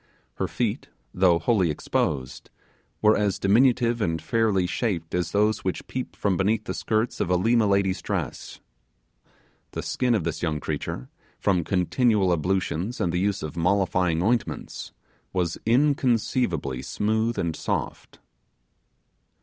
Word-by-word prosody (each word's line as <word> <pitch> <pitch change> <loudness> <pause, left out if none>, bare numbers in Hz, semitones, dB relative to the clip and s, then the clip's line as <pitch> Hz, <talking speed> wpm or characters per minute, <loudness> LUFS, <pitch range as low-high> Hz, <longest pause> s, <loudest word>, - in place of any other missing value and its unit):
Her - - -1
feet, - - -2 0.3
though 90 -2 +4
wholly 95 0 +2
exposed, 70 -3 -2 0.5
were 110 0 +6
as 105 -2 +1
diminutive 120 +2 +3
and 85 -5 0
fairly 105 +1 +1
shaped 90 -5 -2
as 90 -1 0
those 105 +1 +1
which 95 - -3
peep 130 -1 -5
from 100 -3 0
beneath 105 +4 +1
the - - -4
skirts 110 +1 -1
of - - 0
a 90 - +3
Lima 110 +4 +3
lady's 100 -1 +1
dress. 90 -10 -4 1.1
The - - -4
skin 125 -2 +1
of 100 - 0
this 80 -1 -3
young 80 -3 -1
creature, 60 -2 -4 0.3
from 90 -4 +1
continual 95 +2 +2
ablutions 95 +4 -1
and 85 -2 0
the 90 - +1
use 100 -1 0
of 75 - -5
mollifying 90 -1 +1
ointments, 115 +3 -2 0.4
was 90 -3 -1
inconceivably 120 - +1
smooth 110 - -1
and 85 -2 -1
soft. - - -4
95 Hz, 135 wpm, -25 LUFS, 85-110 Hz, 1.1 s, were